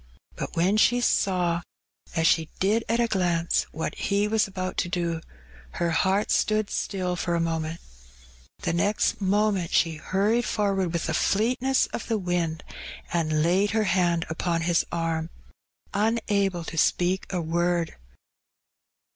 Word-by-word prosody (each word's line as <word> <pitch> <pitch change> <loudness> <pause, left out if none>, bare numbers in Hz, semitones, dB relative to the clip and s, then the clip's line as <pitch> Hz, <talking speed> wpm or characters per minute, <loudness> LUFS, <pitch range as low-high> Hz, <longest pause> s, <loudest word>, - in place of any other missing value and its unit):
Bat - - -4
when 185 +5 +2
she 245 +3 +4
saw 180 -7 +1 0.3
— - - -23
as 165 -1 +1
she 160 -1 +3
did 215 +4 +2
at 230 +1 +2
a 235 - +4
glance 175 -6 +1
— - - -29
what 160 - -3
he 200 +1 0
was 215 -1 +2
about 185 -1 -4
to 175 - 0
do^ 170 -2 -1 0.5
her 170 -1 -1
heart 190 +5 +1
stood 215 -1 +1
still 185 -2 -2
for 175 -1 -1
a - - +1
moment; 165 0 -2 0.8
the - - 0
next 205 +5 +1
moment 200 -2 +1
she 165 -2 +2
harried 210 +5 +1
forward 195 -5 0
with 170 -1 -2
the - - -1
fleetness 250 +5 +2
of - - -4
the 225 -2 0
wind^ 175 -3 -1 0.5
and 155 -3 +1
laid 185 +5 +3
her 220 - +3
hand 175 -4 +1
apon 165 +1 -1
his 170 0 +2
arm^ 165 -1 -1 0.6
unable 200 -4 +1
to 165 0 -3
speak 180 +3 +1
a 185 - -1
word. 170 0 0
180 Hz, 155 wpm, -26 LUFS, 170-205 Hz, 0.8 s, she